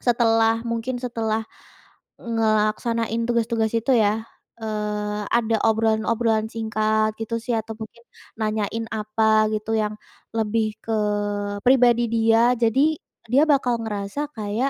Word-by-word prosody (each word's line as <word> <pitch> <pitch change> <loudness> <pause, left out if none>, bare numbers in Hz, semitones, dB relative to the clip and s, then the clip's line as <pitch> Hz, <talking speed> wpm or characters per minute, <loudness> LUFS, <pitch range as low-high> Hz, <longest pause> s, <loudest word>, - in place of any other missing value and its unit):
setelah, 225 -1 +2
mungkin 230 +2 -2
setelah 225 -3 -2 0.8
ngelaksanain 225 0 0
tugas-tugas 230 -1 0
itu 235 +3 +2
yah, 215 0 +2 0.4
eee, 210 -1 -3
ada 230 -1 +2
obrolan-obrolan 220 0 +1
singkat 215 -1 0
gitu 225 +1 -2
sih 235 0 -1
atau 220 0 -4
mungkin 230 +1 -10 0.3
nanyain 220 +1 -2
apa 215 0 +2
gitu 215 +1 -2
yang 215 -1 -1 0.4
lebih 215 0 0
ke 225 - -3 0.7
pribadi 245 -2 +5
dia, 230 +2 +4
jadi 250 +6 +2 0.3
dia 255 +6 +3
bakal 245 -5 +2
ngerasa 215 +7 -4
kayak, 215 +5 -1
225 Hz, 115 wpm, -23 LUFS, 215-235 Hz, 0.8 s, pribadi